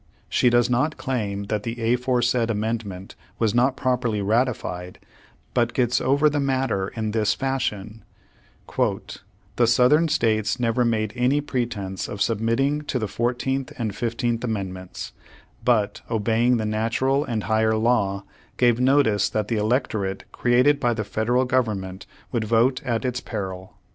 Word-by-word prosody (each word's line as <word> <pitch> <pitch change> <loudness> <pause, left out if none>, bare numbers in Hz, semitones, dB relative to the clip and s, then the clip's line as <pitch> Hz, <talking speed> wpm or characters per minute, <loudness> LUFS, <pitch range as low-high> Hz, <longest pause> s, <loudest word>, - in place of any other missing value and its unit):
She 125 - +3
does 120 0 +3
not 130 +6 0
claim 105 -6 -2
that 105 +1 -2
the 115 +1 -1
aforesaid 125 -1 +1
amendment 105 -3 -3 0.2
was 110 -3 +1
not 130 +2 +2
properly 125 -5 0
ratified, 100 -4 -1 0.6
but 120 -1 +1
gets 120 -1 +2
over 140 +3 +3
the 145 -1 +1
matter 130 -8 0
in 110 -2 -2
this 110 -1 +1
fashion: 110 -6 -3 0.7
"The 120 - -2
Southern 125 +7 +4
States 110 -6 +1
never 120 +1 +1
made 110 -3 0
any 125 +4 +2
pretense 115 -9 -3
of 105 - -6
sub 110 0 +1
mitting 135 +6 +1
to 135 - -1
the 110 -3 -2
Fourteenth 125 +4 -2
and 110 -4 -3
Fifteenth 115 0 -1
Amendments, 95 -5 -5 0.5
but, 115 -5 +1
obeying 115 +2 +2
the 110 - -2
natural 115 +6 +1
and 115 -6 -3
higher 110 0 +2
law, 110 -4 +1 0.3
gave 120 -1 +3
notice 125 -6 +3
that 105 -1 -2
the 115 - 0
electorate 105 -3 -1
created 125 +4 +3
by 120 -3 +1
the 110 - -2
Federal 120 +5 0
Government 105 -7 -1 0.3
w^ould 115 -3 0
vote 115 +4 +2
at 120 0 -1
its 125 0 -1
peril." 95 -4 -6
115 Hz, 145 wpm, -23 LUFS, 105-125 Hz, 0.7 s, Southern